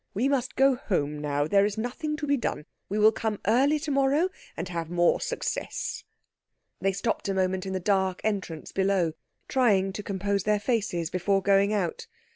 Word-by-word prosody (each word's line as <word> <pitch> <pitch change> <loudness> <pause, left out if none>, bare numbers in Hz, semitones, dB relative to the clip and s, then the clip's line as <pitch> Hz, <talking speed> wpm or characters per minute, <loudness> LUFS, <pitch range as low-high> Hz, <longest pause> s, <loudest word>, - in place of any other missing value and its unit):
We 235 +7 +2
must 270 -3 0
go 270 0 +5
home 150 - -1
now. 145 -1 0
There 200 +5 +4
is 205 +1 -1
nothing 300 +7 -3
to 300 - -3
be 285 0 +2
done. 230 - -3 0.2
We 205 - -1
will 215 +1 +6
come 220 -1 -3
early 265 +8 +4
to 305 -1 -3
morrow, 275 +6 +3 0.3
and - - -3
have 165 -2 -4
more 175 0 +2
success." - - -3 0.8
They 195 - +1
stopped 200 +1 -2
a 195 - 0
moment 190 0 0
in 190 - -3
the 190 - -1
dark 190 -1 +1
entrance 190 -7 -3
below, 190 -4 +1 0.3
trying 200 -7 +2
to 210 - -4
compose 200 0 -1
their 210 +2 +1
faces 200 -7 -1
before 195 +2 +1
going 200 +1 +4
out. 190 -6 -2
200 Hz, 185 wpm, -27 LUFS, 185-240 Hz, 0.8 s, will